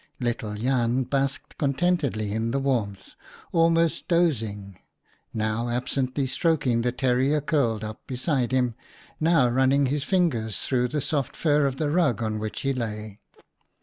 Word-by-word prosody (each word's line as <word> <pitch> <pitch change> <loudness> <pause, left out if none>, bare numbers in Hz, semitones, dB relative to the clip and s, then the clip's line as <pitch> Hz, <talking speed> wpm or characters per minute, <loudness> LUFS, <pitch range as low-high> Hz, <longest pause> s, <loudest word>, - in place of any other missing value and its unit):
Little 115 -4 -2
Jan 125 +2 +1
basked 135 +2 -2
contentedly 140 - 0
in 110 +2 -1
the 130 - 0
warmth, 115 -8 -2 0.4
almost 165 -1 +2
dozing 110 - 0 0.3
— - - -35 0.2
now 110 +2 -1
absently 130 +2 -1
stroking 135 -3 +1
the 125 +1 0
terrier 130 +4 +1
curled 130 -8 0
up 110 0 -8
beside 130 -1 -1
him, 125 -2 +1 0.5
now 160 -5 +4
running 130 +3 +3
his 140 +2 -1
fingers 145 - 0
through 125 -2 +1
the 145 +4 -2
softer 140 -1 -2
fur 150 -3 +3
of 135 -1 -3
the 145 0 0
rug 140 - +2
on 110 -1 -2
which 110 0 -4
he 135 0 0
lay. 110 -4 -5
130 Hz, 150 wpm, -25 LUFS, 115-145 Hz, 0.5 s, now